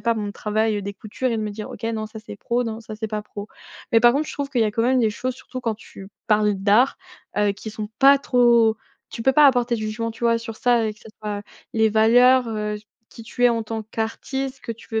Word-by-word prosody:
pas 230 0 +1
mon 210 -2 -3
travail, 215 +1 0
heu, 205 - -3
des 200 +1 -5
coutures 215 +6 -4
et 230 - 0
de 220 - -2
me 210 - -3
dire: 210 +1 -7
«OK. - - -10
Non 220 -1 -2
ça 220 +1 -10
c'est 205 - -9
pro. 240 +4 -1
Non 225 -1 -4
ça 225 -1 -8
c'est 220 +1 -4
pas 210 0 -3
pro.», 205 0 -9 0.4
mais 225 - +7
par 240 0 +6
contre 295 +4 0
je - - -6
trouve 285 -1 -3
qu'il 250 -4 0
y - - +4
a 215 - +1
quand 225 +2 -1
même 255 +2 +3
des 220 -2 +2
choses 255 +4 -3
surtout 255 0 -8
quand 230 -3 -1
tu 195 -2 -13 0.2
parles 210 -1 +3
d'art, 205 +7 +3 0.4
heu, 205 -1 +3
qui 205 +2 -8
sont 215 0 -6
pas 275 +1 +7
trop 235 -4 +4 0.3
tu 230 - -7
peux 265 - +4
pas 295 +2 +7
apporter 245 -3 +3
de 220 - -6
jugement, 215 +2 -3
tu 230 +1 -7
vois? 230 0 +4
Sur 230 -1 -7
ça 240 -2 +2
et 215 - -3
que 210 - -21
ça - - -14
soit 205 -1 -4 0.3
les 220 -1 +3
valeurs, 245 +3 +5
heu, 210 -1 -2 0.3
qui 230 - -12
tu 245 +2 -2
es - - +8
en 230 -1 0
tant 220 0 -5
qu'artiste, 260 +5 -4
ce - - -26
que 230 - -5
tu 230 - -16
veux 220 - +1
225 Hz, 275 wpm, -22 LUFS, 215-240 Hz, 0.4 s, es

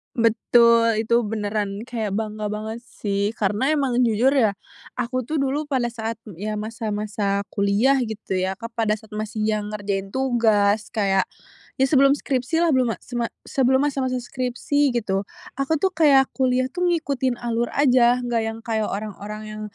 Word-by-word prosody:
Betul, 230 -1 +4
itu 235 +1 +3
beneran 205 -1 -2
kayak 225 -5 -3
bangga 215 -1 -3
banget 215 +2 -4
sih, 205 -1 -3
karena 210 +6 +1
emang 265 -4 +1
jujur 240 +2 +3
ya, 220 -8 +3 0.4
aku 250 +1 -1
tuh 310 - -2
dulu 285 +2 -1
pada 250 -4 0
saat 225 -1 -3 0.2
ya 215 +1 -3
masa-masa 210 -2 -2
kuliah 205 +7 +3
gitu 220 -4 -4
ya, 190 +1 -1
Kak, 230 +1 -7
pada 220 -2 +1
saat 220 0 -18
masih 215 0 -3
yang 215 -1 0
ngerjain 200 -2 -3
tugas, 220 -4 +2
kayak 195 -2 +2 0.5
ya 265 - +4
sebelum 275 0 +4
skripsilah, 300 +7 0
belum 250 -4 +2
ma - - -22
sema 240 -2 -2 0.2
sebelum 265 -1 +2
masa-masa 265 -3 0
skripsi 255 +3 0
gitu, 195 -4 -1 0.4
aku 275 +4 +1
tuh 380 +5 +1
kayak 280 -5 +4
kuliah 255 -1 +1
tuh 360 0 0
ngikutin 275 -7 0
alur 235 0 -1
aja 250 -3 +4
nggak 240 -2 0
yang 225 0 -4
kayak 220 -2 0
orang-orang 210 +1 -5
yang 215 0 -7
230 Hz, 160 wpm, -23 LUFS, 210-260 Hz, 0.5 s, Betul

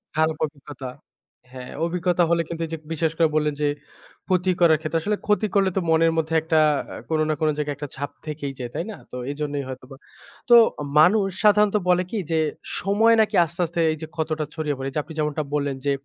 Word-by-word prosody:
খারাপ 160 0 +1
অভিজ্ঞতা। 140 -3 -9 0.6
হ্যাঁ, 125 -1 -9
অভিজ্ঞতা 175 0 +1
হলে 170 0 +3
কিন্তু 165 0 -5
এই 160 - -10
যে - - -2
বিশ্বাস 160 0 0
করে 165 - +4
বললেন 150 -1 +1
যে, 150 - +2 0.6
ক্ষতি 185 0 +2
করার 160 -2 +6
ক্ষেত্রে 165 +1 -1
আসলে 210 +2 -1
ক্ষতি 210 +1 +2
করলে 195 -1 +4
তো 190 - +2
মনের 165 0 +4
মধ্যে 160 0 -1
একটা 160 0 +2 0.3
আ - - -7
কোন 160 - +1
না - - +2
কোন 155 - +3
জায়গায় 150 -1 -2
একটা 145 0 -6
ছাপ 140 +1 -4
থেকেই 145 -3 -5
যায়। 120 - -4
তাই 170 - -2
না? 205 - -7 0.2
তো - - -7 0.2
এইজন্যই 145 -1 -3
হয়তোবা। 130 +1 -9 0.5
তো 240 - +9 0.4
মানুষ 195 +5 +5 0.2
সাধারণত 210 0 +5
বলে 180 0 +4
কি 225 - -2
যে 160 - +2 0.4
সময় 220 +4 +4
নাকি 215 - 0
আস্তে, 170 +2 -9
আস্তে, 170 +1 -5
এই 155 - -3
যে 160 - -5
ক্ষতটা 155 -1 -2
ছড়িয়ে 155 -3 -2
পড়ে। 135 +1 -3
যে 150 - 0
আপনি 160 - -11
যেমনটা 150 0 -1
বললেন 140 -2 0
যে 140 - +2
160 Hz, 210 wpm, -23 LUFS, 150-180 Hz, 0.6 s, তো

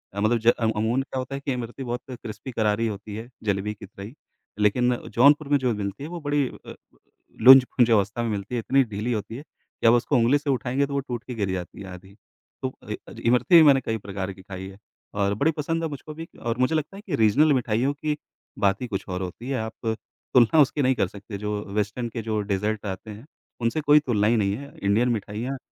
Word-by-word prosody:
मतलब 110 +4 +2
ज 115 - -5
अ, 120 - +10 0.2
अमून 115 +5 +1
क्या 135 - -7
होता 130 +2 -4
है 140 - -6
कि 135 - 0
इमरती 125 +2 -5
बहुत 120 0 -3
क्रिस्पी 115 0 -8
करारी 110 0 +1
होती 105 0 -6
है, 115 +2 -7 0.2
जलेबी 105 0 -1
की 100 - -11
तरह 100 - -11
ही, 115 - -10 0.5
लेकिन 125 +4 +3 0.2
जौनपुर 145 +4 +5
में 145 - +4
जो 125 -3 +1
मिलती 100 +5 -4
है 155 - -6
वो 175 -1 -6
बड़ी 145 -2 +1
अ, - - -11 0.7
लुंज-पुंज 125 -2 +7
अवस्था 105 +2 +2
में 115 - -1
मिलती 105 +4 -4
है, - - 0
इतनी 135 +4 +3
ढीली 110 +1 -4
होती 110 +1 -4
है, 145 - -9
कि 115 - -5
आप 115 - +7
उसको 120 +3 +2
ऊँगली 120 +5 +4
से 145 0 -5
उठाएँगे 130 +1 +1
तो 140 - -7
वो 140 - +1
टूट 125 -3 -5
के 125 - -5
गिर 100 -3 -1
जाती 90 +1 -5
है 95 - -8
आधी, 95 +2 -13 0.5
तो - - -2 0.2
इ - - -1
अ, - - -10
इमरती 125 +8 +4
भी 165 - +10
मैंने 135 -3 +6
कई 110 - -1
प्रकार 100 -2 -5
की 95 - -15
खाई 95 0 -7
है। 95 - -13 0.4
और 100 0 +1
बड़ी 150 +9 +2
पसंद 165 +2 -1
है 160 - -1
मुझको 150 +1 -8
भी 165 +1 -7
और 120 -1 -2
मुझे 130 +5 +2
लगता 155 +5 -2
है 205 - -9
कि 165 - 0
रीज़नल 135 +8 +4
मिठाइयों 125 +1 +1
की 150 +1 -2 0.4
बात 100 +2 +2
ही 125 - -3
कुछ 100 -4 -4
और 90 0 -3
होती 95 +7 -6
है 135 - -1
आप 110 0 -3 0.4
तुलना 125 +5 +6
उसकी 145 +1 +2
नहीं 130 -1 +3
कर 95 - +1
सकते 100 +2 -9
जो 105 +1 -3 0.2
वेस्टर्न 105 +3 -1
के 115 0 -5
जो 110 -1 -1
डेज़र्ट 105 +1 -2
आते 100 +2 -5
हैं, 110 +6 -11 0.4
उनसे 115 +7 0
कोई 150 0 +6
तुलना 110 -8 +1
ही 115 - +3
नहीं 100 -1 +1
है, 140 +2 -10
इंडियन 110 +5 +3
मिठाइयाँ, 115 +4 -3
115 Hz, 240 wpm, -25 LUFS, 105-135 Hz, 0.7 s, अ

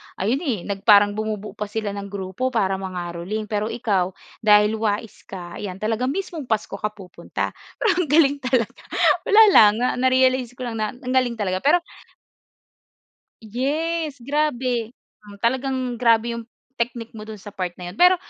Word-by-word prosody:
ayon 225 +8 0
eh 260 - -2
nag 200 0 -5
parang 205 -1 +7
bumubuo 215 -1 -3
pa 210 - -2
sila 215 0 -3
ng 200 0 -6
grupo 195 +4 -3
para 195 -4 +1
mangaroling. 180 +2 -4
Pero 210 0 -1
ikaw, 205 -5 0 0.3
dahil 210 0 +4
wais 215 0 -3
ka, 175 -3 -8
ayan, 190 -3 -5
talaga 225 +3 0
mismong 320 -2 -4
Pasko 215 -3 -1
ka 210 0 -2
pupunta. 190 -3 -5 0.3
Pero 450 - +1
ang - - -5
galing 285 -1 +4
talaga. 255 -4 0 0.5
Wala 425 +2 +7
lang, 210 - +8
na 250 - +3
na-realize 255 -1 +3
ko 255 - -7
lang 230 -2 -4
na 215 +1 -1
ang 250 0 -6
galing 255 -2 +2
talaga. 185 -4 -1
Pero 320 - +3 1.6
Yes. 295 +6 -2
Grabe. 250 -4 -1 0.3
Hmm, 205 -1 -13
talagang 255 +1 -1
grabe 235 0 +2
yung 235 - -6 0.4
technique 235 -1 -3
mo 215 -1 -10
do'n 215 -1 -8
sa 205 +2 -10
part 180 -3 -4
na 180 -1 -7
yun. 190 - -16
Pero, 360 +1 +7
225 Hz, 165 wpm, -22 LUFS, 205-255 Hz, 1.6 s, lang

